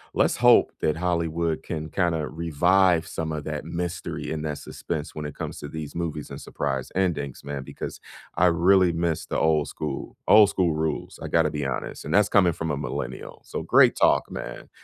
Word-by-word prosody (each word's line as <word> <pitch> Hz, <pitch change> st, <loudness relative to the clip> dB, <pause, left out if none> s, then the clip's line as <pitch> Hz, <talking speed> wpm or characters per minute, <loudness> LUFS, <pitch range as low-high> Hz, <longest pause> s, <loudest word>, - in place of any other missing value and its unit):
let's -, -, +2 dB
hope -, -, +6 dB
that 75 Hz, +1 st, +1 dB
Hollywood 85 Hz, -2 st, -1 dB
can 80 Hz, -1 st, -5 dB
kinda 85 Hz, -5 st, 0 dB
revive 85 Hz, +2 st, +2 dB
some 80 Hz, -1 st, -4 dB
of 75 Hz, -1 st, -4 dB
that 75 Hz, -1 st, -4 dB
mystery 85 Hz, +1 st, -4 dB
and 80 Hz, -1 st, -3 dB
that 75 Hz, -2 st, -3 dB
suspense 75 Hz, -1 st, -5 dB
when 75 Hz, -, -5 dB
it 75 Hz, -, -6 dB
comes -, -, -6 dB
to -, -, -6 dB
these 75 Hz, -1 st, -7 dB
movies 80 Hz, -3 st, -4 dB
and -, -, -7 dB
surprise 65 Hz, -1 st, -3 dB
endings, 80 Hz, -8 st, -1 dB
man, 70 Hz, -1 st, -5 dB
because -, -, -7 dB, 0.3 s
I 90 Hz, +2 st, +4 dB
really 90 Hz, +2 st, +4 dB
miss 85 Hz, -1 st, -1 dB
the -, -, -2 dB
old 80 Hz, -2 st, +2 dB
school. 75 Hz, -3 st, -5 dB
Old 105 Hz, -1 st, +8 dB
school 85 Hz, -4 st, +1 dB
rules. 80 Hz, 0 st, -3 dB
I -, -, -4 dB
gotta 80 Hz, -2 st, +2 dB
be 75 Hz, -1 st, -3 dB
honest, 65 Hz, -2 st, -4 dB
and 75 Hz, -, -3 dB
that's 105 Hz, +1 st, +4 dB
coming 90 Hz, -4 st, +4 dB
from 80 Hz, -1 st, -3 dB
a 70 Hz, -, -1 dB
millennial. 65 Hz, -3 st, -5 dB
So, -, -, -4 dB
great -, -, +5 dB
talk, -, -, +3 dB
man. -, -, -7 dB
80 Hz, 195 wpm, -25 LUFS, 75-85 Hz, 0.3 s, Old